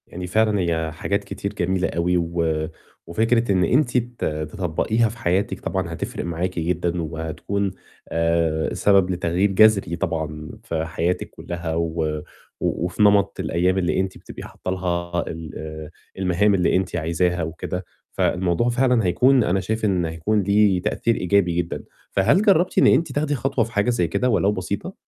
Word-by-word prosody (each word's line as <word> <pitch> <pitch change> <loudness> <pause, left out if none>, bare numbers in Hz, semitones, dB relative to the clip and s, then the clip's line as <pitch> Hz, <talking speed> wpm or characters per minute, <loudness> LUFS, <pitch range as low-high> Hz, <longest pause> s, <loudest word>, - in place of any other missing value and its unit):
يعني 90 +1 -6
فعلًا 110 +2 +2
هي 80 -3 -1
حاجات 100 +6 -2
كتير 100 +1 -5
جميلة 95 0 0
أوي 90 +1 +1
و 85 -2 -1 0.4
وفكرة 115 +5 +1
إن 95 -2 +3
أنتِ 125 - +2
ت 120 0 -2
تطبّقيها 90 +8 0
في 115 - -10
حياتِك 95 0 0
طبعًا 90 -3 -3
هتفرِق 85 - -4
معاكِ 85 +1 -2
جدًا 85 +1 -1
وهتكون 80 +5 -3 0.4
آآ، 80 -1 +1
سبب 95 -2 +3
لتغيير 90 +2 +1
جَذري 100 -3 +4
طبعًا 80 -4 -3
في 80 -7 -2
حياتِك 85 +2 -2
كلّها 85 -2 -5
و 80 -1 -1 0.5
و - - -1
وفي 90 +3 -3
نمط 100 -1 +3
الأيام 90 +3 +1
اللي 90 -1 +1
أنتِ 95 0 -2
بتبقي - - -10
حاطّة 95 - -6
لها 85 -2 -2
ال 80 -1 -6
آآ 80 0 -7 0.3
المهام 95 +2 +2
اللي 90 -2 +2
أنتِ 90 -2 -1
عايزاها 85 +1 0
وكده، 85 +3 -5 0.3
فالموضوع 90 +6 +1
فعلًا 125 -2 +2
هيكون 125 +8 +4
أنا 95 -1 +1
شايف 110 +2 -2
إن 90 -4 +1
هيكون 80 +7 0
ليه 100 -1 +3
تأثير 115 +5 0
إيجابي 90 -1 +2
جدًا. 85 -1 -2 0.3
فهل 100 - +3
جرّبتِ 185 -4 +3
إن - - +6
أنتِ 165 - +3
تاخدي 145 0 0
خطوة 135 -1 0
في 115 - -11
حاجة 105 +1 +1
زي 115 -8 +1
كده 125 +10 0
ولو 105 -3 +3
بسيطة؟ 100 - -4
90 Hz, 165 wpm, -22 LUFS, 85-105 Hz, 0.5 s, إن